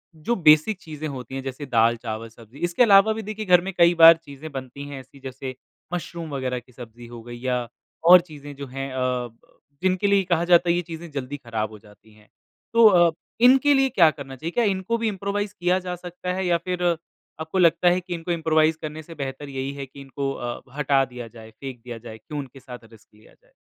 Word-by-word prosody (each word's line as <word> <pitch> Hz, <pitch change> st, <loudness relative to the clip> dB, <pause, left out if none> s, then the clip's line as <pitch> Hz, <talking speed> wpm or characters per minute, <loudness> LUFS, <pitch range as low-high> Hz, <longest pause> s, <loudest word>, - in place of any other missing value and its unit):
जो 160 Hz, +10 st, -1 dB
बेसिक 155 Hz, +3 st, +5 dB
चीज़ें 155 Hz, -2 st, -6 dB
होती 130 Hz, -3 st, -7 dB
हैं 135 Hz, -, -3 dB
जैसे 135 Hz, +2 st, -6 dB
दाल, 115 Hz, -2 st, +3 dB
चावल, 115 Hz, -1 st, -6 dB
सब्जी 115 Hz, +4 st, -16 dB
इसके 175 Hz, +8 st, +3 dB
अलावा 205 Hz, -1 st, +6 dB
भी 220 Hz, -, -5 dB
देखिए 215 Hz, 0 st, -6 dB
घर 180 Hz, -2 st, +6 dB
में 195 Hz, +2 st, -5 dB
कई 170 Hz, 0 st, +6 dB
बार 165 Hz, 0 st, +10 dB
चीज़ें 155 Hz, -1 st, -11 dB
बनती 135 Hz, +1 st, -7 dB
हैं 140 Hz, -1 st, -7 dB
ऐसी 130 Hz, +1 st, -16 dB
जैसे 130 Hz, 0 st, -7 dB, 0.4 s
मुशरूम 170 Hz, -2 st, -5 dB
वगैरह 130 Hz, -2 st, -2 dB
की 125 Hz, +1 st, -22 dB
सब्जी 120 Hz, -1 st, -12 dB
हो 120 Hz, -1 st, -10 dB
गयी 120 Hz, +1 st, -10 dB
या 125 Hz, -2 st, -1 dB, 0.4 s
और 180 Hz, 0 st, +10 dB
चीज़ें 145 Hz, -4 st, -11 dB
जो 140 Hz, 0 st, -7 dB
हैं 135 Hz, +1 st, -5 dB
अ 130 Hz, -, -3 dB, 0.3 s
ब 115 Hz, 0 st, -23 dB, 0.4 s
जिनके 185 Hz, +2 st, +2 dB
लिए 200 Hz, -1 st, +3 dB
कहा 170 Hz, -2 st, 0 dB
जाता 175 Hz, 0 st, +4 dB
है 170 Hz, -, +4 dB
ये 175 Hz, -, 0 dB
चीज़ें 170 Hz, 0 st, -9 dB
जल्दी 140 Hz, 0 st, -5 dB
खराब 115 Hz, -5 st, -4 dB
हो 110 Hz, -, -10 dB
जाती 105 Hz, +2 st, -20 dB
हैं। 105 Hz, 0 st, -22 dB, 0.5 s
तो 230 Hz, -1 st, +7 dB
अ, 175 Hz, -4 st, +5 dB, 0.3 s
इनके 265 Hz, +4 st, +6 dB
लिए 270 Hz, -1 st, +3 dB
क्या 170 Hz, -9 st, +5 dB
करना 135 Hz, -3 st, -9 dB
चाहिए? 160 Hz, +6 st, -5 dB
क्या 240 Hz, -, +1 dB
इनको 200 Hz, +2 st, 0 dB
भी 230 Hz, 0 st, -1 dB
इम्प्रोवाइज़ 200 Hz, 0 st, -3 dB
किया 180 Hz, +1 st, +2 dB
जा 180 Hz, -1 st, -5 dB
सकता 180 Hz, +1 st, -6 dB
है 190 Hz, 0 st, -2 dB
या 175 Hz, -1 st, +3 dB
फिर 180 Hz, +1 st, -4 dB, 0.6 s
आपको 160 Hz, +4 st, -4 dB
लगता 170 Hz, 0 st, +4 dB
है 180 Hz, +1 st, +2 dB
कि 180 Hz, 0 st, -6 dB
इनको 170 Hz, +1 st, -4 dB
इम्प्रोवाइज़ 160 Hz, -1 st, +2 dB
करने 155 Hz, +1 st, -6 dB
से 165 Hz, +2 st, -12 dB
बेहतर 140 Hz, 0 st, -6 dB
यही 135 Hz, 0 st, -4 dB
है 140 Hz, -1 st, -6 dB
कि 135 Hz, +1 st, -13 dB
इनको 135 Hz, 0 st, -4 dB
अ, 120 Hz, -2 st, -5 dB, 0.2 s
हटा 140 Hz, -2 st, +3 dB
दिया 125 Hz, -2 st, -9 dB
जाए, 110 Hz, -1 st, -13 dB
फेंक 130 Hz, +2 st, -9 dB
दिया 120 Hz, -2 st, -7 dB
जाए, 110 Hz, -1 st, -10 dB
क्यों 145 Hz, +7 st, -7 dB
उनके 135 Hz, -1 st, -9 dB
साथ 125 Hz, -1 st, -10 dB
रिस्क 110 Hz, -1 st, -18 dB
लिया 110 Hz, -, -21 dB
जाए? -, -, -30 dB
150 Hz, 230 wpm, -24 LUFS, 130-180 Hz, 0.6 s, बार